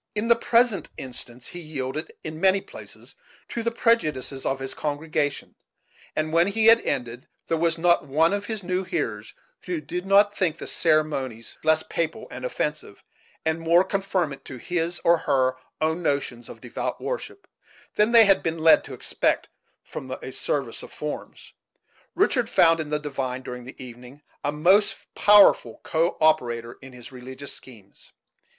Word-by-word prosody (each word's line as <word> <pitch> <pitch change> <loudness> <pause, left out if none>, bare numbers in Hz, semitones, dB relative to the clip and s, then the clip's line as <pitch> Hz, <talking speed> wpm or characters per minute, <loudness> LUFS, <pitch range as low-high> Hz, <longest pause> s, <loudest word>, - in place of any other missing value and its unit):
In 215 +3 -1
the 235 - +7
present 230 -5 +2
instance 125 -1 -6
he 175 - -8
yielded, 155 -2 -5
in 155 0 -7
many 190 0 +4
places, - - -12 0.4
to 235 - -3
the 230 - 0
prejudices 155 - 0
of 135 - -1
his 135 0 -4
congregation; 150 -1 -2 0.6
and 155 +1 -1
when 170 +2 +4
he 220 +2 +1
had 230 +1 +7
ended, 125 0 -3 0.2
there 165 - 0
was 165 0 +1
not 170 -2 +3
one 160 +6 +3
of 205 0 -3
his 220 -3 -4
new 180 +1 -1
hearers 120 - -4 0.3
who 180 -3 -3
did 175 +5 -5
not 205 +1 +5
think 165 -5 0
the - - -7
ceremonies 150 -8 -1
less 160 0 +3
papal 165 +6 -3
and - - -8
offensive, - - -4 0.4
and 160 +1 0
more 170 +2 +4
conformant 190 -7 -2
to 130 - -8
his 175 +5 -2
or 170 0 +4
her 130 -4 +1 0.2
own 160 +2 0
notions 140 -6 -2
of - - -11
devout - - -4
worship, - - -5 0.5
than 210 +2 +3
they 230 -2 +8
had 195 -1 +4
been 165 0 -2
led 160 0 +5
to - - -8
expect - - -1 0.3
from 130 - -8
a 130 0 -6
service 135 -3 -3
of - - -11
forms, 150 -1 -7 0.6
Richard - - +2
found 165 0 +4
in 155 -2 -4
the 150 - 0
divine, 135 -3 -4
during 125 -1 -7
the 130 - -10
evening, 125 +3 -12 0.2
a 145 - 0
most 185 +8 +2
powerful 205 - +5
co 165 +2 0
operator 120 -7 +1
in 135 0 -11
his 125 0 -12
religious 130 +2 -8
schemes. 105 -7 -14
155 Hz, 165 wpm, -25 LUFS, 130-180 Hz, 0.6 s, they